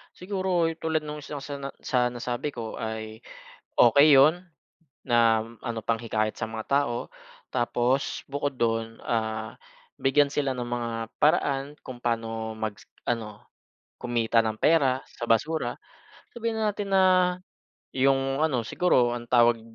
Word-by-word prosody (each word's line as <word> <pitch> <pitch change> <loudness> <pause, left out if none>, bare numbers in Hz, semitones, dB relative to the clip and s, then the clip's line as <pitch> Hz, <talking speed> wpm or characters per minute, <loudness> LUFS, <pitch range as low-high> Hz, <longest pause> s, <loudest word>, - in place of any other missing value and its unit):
Siguro 185 -3 0
yung 165 - -11
tulad 160 -1 -1
nung 150 0 -6
isa 145 -1 -7
sa 140 -1 -6
na 135 0 -6
sa 125 -1 +2
nasabi 120 +2 -3
ko 115 -6 -6
ay 110 0 -5 0.6
okey 140 +5 +7
yun 160 +7 +5 0.6
na 115 -2 +3 0.2
ano 115 -2 -3
panghikayat 110 -1 -1
sa 110 - -2
mga 110 0 -7 0.2
tao 120 -1 -4 0.4
tapos 120 +3 0
bukod 140 0 -2
dun, 115 -2 -1
ah, 110 -1 -2 0.4
bigyan 140 +2 +3
sila 140 -2 -1
ng 125 -1 -4
mga 120 -1 -2 0.3
paraan 140 -2 +2
kung 130 - -8
paano 115 -2 -2
mag 110 -2 -4 0.3
ano 110 -3 -3 0.6
kumita 115 -1 +1
ng 110 -1 -3
pera 135 -5 +3
sa - - -7
basura. 150 +8 0 0.6
Sabihin 230 -1 -2
na 215 - +1
natin 200 -1 -4
na 190 -1 +5 0.9
yung 135 +1 +2
ano 130 -8 +1
siguro 125 -6 +2
ang 120 -1 -7
tawag 120 -2 +4
125 Hz, 140 wpm, -26 LUFS, 115-145 Hz, 0.9 s, okey